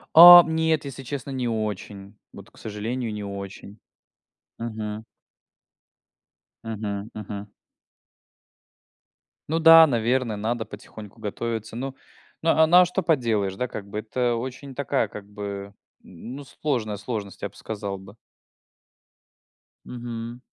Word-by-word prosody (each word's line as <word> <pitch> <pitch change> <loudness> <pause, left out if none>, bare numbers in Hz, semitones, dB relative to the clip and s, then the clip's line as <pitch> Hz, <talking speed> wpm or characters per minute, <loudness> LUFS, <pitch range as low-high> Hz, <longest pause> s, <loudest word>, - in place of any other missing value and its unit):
А, 175 +2 +12
нет, 160 -2 0
если 135 -1 -7
честно, 140 +1 -5
не 130 -2 -2
очень, 105 -3 -4 0.2
вот, - - -12
к - - -24
сожалению, 110 +2 -4
не 105 -1 -5
очень. 100 0 -8 0.8
Мгм. 110 -2 -5 1.6
Мгм 105 -2 -4
мгм. 105 -1 -7 2.0
Ну 160 - +1
да, 165 0 +9
наверное, 120 -2 0
надо 115 +2 -2
потихоньку 105 0 -12
готовиться. 110 +1 -4
Ну 135 +2 -4 0.5
ну, 165 - +4
а, 160 0 +5
ну 175 +3 +6
а - - +5
что 180 +2 -2
поделаешь, 115 - +1
да, 125 +6 -2
как 100 -4 -7
бы? 105 - -4
Это 120 +2 -1
очень 130 +3 -6
такая, 140 -3 0
как 105 0 -10
бы, 100 -1 -7 0.3
ну 120 +11 -9
сложная 120 -5 -2
сложность, 105 -2 -6
я - - -3
б - - -25
сказал 100 -2 -5
бы. 95 +2 -14 1.7
Мгм. 120 0 -7
115 Hz, 125 wpm, -25 LUFS, 105-130 Hz, 2.0 s, А